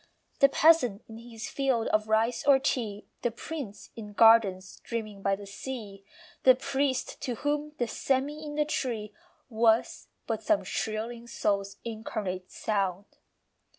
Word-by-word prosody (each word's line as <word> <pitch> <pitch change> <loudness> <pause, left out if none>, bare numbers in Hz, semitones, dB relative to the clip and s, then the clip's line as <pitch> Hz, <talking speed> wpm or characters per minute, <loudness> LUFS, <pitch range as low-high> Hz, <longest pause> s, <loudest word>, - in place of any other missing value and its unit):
The 275 - +7
peasant 270 -9 +4
in 225 0 -10
his 230 -1 -8
field 265 -5 0
of 215 0 +1
rice 220 +2 +1
or 280 -1 +8
tea, 230 -6 -2 0.2
The 240 - +1
prince 235 -3 -7
in 210 -2 -8
gardens 205 -4 +4
dreaming 215 -4 -5
by 195 0 +2
the 200 +1 -10
sea, 200 -1 -7 0.4
The 255 -1 +7
priest 265 0 -1
to 245 - -2
whom 295 +4 -2
the 240 - +1
sêmi 275 +6 -1
in 295 -1 -6
the 300 0 +2
tree 230 -8 -3 0.3
Was 225 -2 +2 0.2
but - - -2
some 320 -2 +2
shrilling 230 +2 -3
soul's 200 -3 -1
incarnate 210 -5 -4
sound. 195 -3 -1
230 Hz, 145 wpm, -29 LUFS, 210-265 Hz, 0.4 s, or